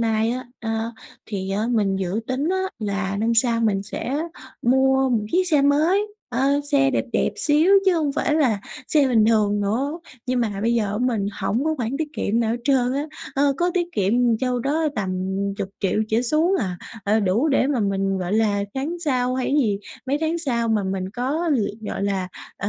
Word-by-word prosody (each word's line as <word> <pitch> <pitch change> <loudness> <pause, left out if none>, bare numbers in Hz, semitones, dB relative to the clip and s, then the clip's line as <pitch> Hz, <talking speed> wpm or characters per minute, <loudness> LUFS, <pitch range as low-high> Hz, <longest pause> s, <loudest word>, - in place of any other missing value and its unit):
nay 225 0 +1
á, 255 0 -4
ờ, 225 0 -2 0.3
thì 195 -2 -4
á 210 +3 0
mình 200 -4 +1
dự 190 +3 -2
tính 270 +5 -1
á, 380 - +1 0.2
là 200 -2 -2
năm 230 +2 +1
sau 230 0 +3
mình 200 -3 +1
sẽ 265 +8 -3 0.4
mua 265 +2 +3
một 225 -4 +1
chiếc 370 +1 +3
xe 295 -4 +3
mới, 320 +9 +3 0.2
ơ, 275 +4 +1
xe 275 -1 +4
đẹp - - 0
đẹp - - +1
xíu 310 +5 +3
chứ 375 - +4
hông 300 -4 0
phải 300 0 0
là 245 -10 +2 0.3
xe 290 -4 +4
bình 225 -4 +4
thường 210 -2 +2
nữa. 265 +11 -1 0.3
Nhưng 250 -1 +1
mà 205 -4 -2
bây 235 +1 +2
giờ 225 -3 +2
á, 210 - -2
mình 235 -5 0
hổng 225 +8 0
có 315 0 +1
khoản 245 +2 -2
tiết 315 -1 -2
kiệm 230 -3 0
nào 225 - +1
hết 235 - 0
trơn 255 -3 +2
á. 285 +3 -2 0.3
Ơ, 280 0 +3
có 350 +1 +1
tiết 350 -1 +1
kiệm, 200 0 +1
ừm, 240 -2 +3
châu 250 -1 0
đó 305 +5 0
tầm 195 -4 -2 0.5
10.000.000 195 +1 -2
trở 225 +2 +2
xuống 310 +9 +2
à, 185 -5 -2 0.3
ờ, 215 +2 +2
đủ 210 +10 +2
để 270 -1 +3
mà 275 -5 0
mình, 195 -1 0
gọi 180 +1 -3
là, 210 -2 +2
tháng 305 +6 -3
sau 255 -6 0
hay 255 -1 -1
cái 280 - 0
gì, 205 -5 +1 0.3
mấy 280 +2 0
tháng 320 +2 0
sau 235 -7 -1
mà 215 -2 +2
mình 190 0 -3
có 285 +9 -1
việc, 205 -2 -1
gọi 205 - -4
là, 195 -2 -1 0.3
ờ, 200 - -3
235 Hz, 215 wpm, -23 LUFS, 205-280 Hz, 0.5 s, xe